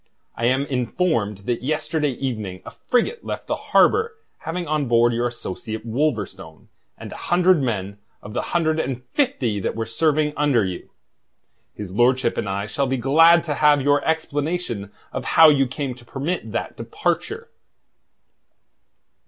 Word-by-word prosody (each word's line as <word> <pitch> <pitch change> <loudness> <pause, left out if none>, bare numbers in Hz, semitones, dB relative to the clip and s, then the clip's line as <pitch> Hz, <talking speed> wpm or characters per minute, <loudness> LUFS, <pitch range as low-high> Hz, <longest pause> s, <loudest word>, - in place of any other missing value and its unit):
I 115 - -2
am 130 +3 +2
informed 120 - -1
that 120 -1 -1
yesterday 150 +1 -1
evening 110 -8 -4
a - - -8
frigate 425 - -1
left - - -5
the - - -1
harbour 450 +1 +4 0.2
having 175 +2 -4
on 150 -2 0
board 120 0 +4
your 120 +1 0
associate 110 -1 -6
Wolverstone 115 -3 -3 0.3
and - - -9
a - - -7
hundred 180 -2 +4
men 100 -5 -3 0.2
of 105 - -9
the - - -1
hundred 160 -2 0
and 130 -5 -3
fifty 135 - 0
that 95 - -2
were 115 0 -2
serving 150 +5 +1
under 140 -8 +2
you. 90 -1 -6 0.9
His 100 -3 -7
lordship 125 +2 +2
and 100 - -2
I 100 +1 -2
shall 135 +6 -1
be 130 +1 0
glad 165 +7 +5
to 155 - -2
have 145 -1 +4
your 145 +1 +3
explanation 150 - -2 0.2
of - - -3
how 160 -1 +10
you 135 -3 +3
came 130 0 -4
to 120 -1 -16
permit 135 0 -4
that 115 - -3
departure." 175 - -3
135 Hz, 155 wpm, -22 LUFS, 115-160 Hz, 0.9 s, how